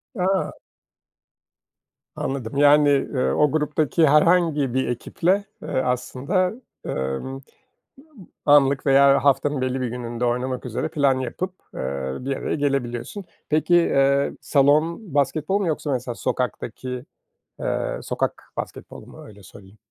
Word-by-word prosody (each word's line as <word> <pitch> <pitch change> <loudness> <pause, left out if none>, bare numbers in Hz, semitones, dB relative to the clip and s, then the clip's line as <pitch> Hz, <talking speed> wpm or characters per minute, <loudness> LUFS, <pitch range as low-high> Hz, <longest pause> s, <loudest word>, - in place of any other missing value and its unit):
A! 190 -1 0 1.6
Anladım. 135 -1 -4
Yani, 145 0 +6
ııı, 135 -2 +1
o 150 -2 +3
gruptaki 155 +1 +1
herhangi 150 -3 +3
bir 130 0 0
ekiple, 180 - 0 0.2
eee, - - -8
aslında, 130 +8 0 0.3
ımm, - - -3 0.3
ııı, 135 0 -7 1.1
anlık 140 -1 +4
veya 140 0 +5
haftanın 145 0 +2
belli 130 0 -1
bir 125 - -1
gününde 120 0 -4
oynamak 125 +1 -1
üzere 120 -2 -2
plan 140 -3 +2
yapıp, 180 +8 -4 0.2
eee, 65 0 -3
bir 135 +1 -3
araya - - -3
gelebiliyorsun. 140 - -2 0.2
Peki, 155 +3 +2
eee, 140 -4 +3
salon 150 +6 +2
basketbol 150 +6 +1
mu 195 - -1
yoksa 155 -2 -2
mesela 125 -1 -2
sokakta 120 +4 -2
ki, 125 +2 -7 0.6
eee, - - -2
sokak - - -2
basketbolu - - -7
mu? - - -13
Öyle 105 -2 -15
söyleyeyim. 95 +2 -15
140 Hz, 125 wpm, -23 LUFS, 125-150 Hz, 1.6 s, Yani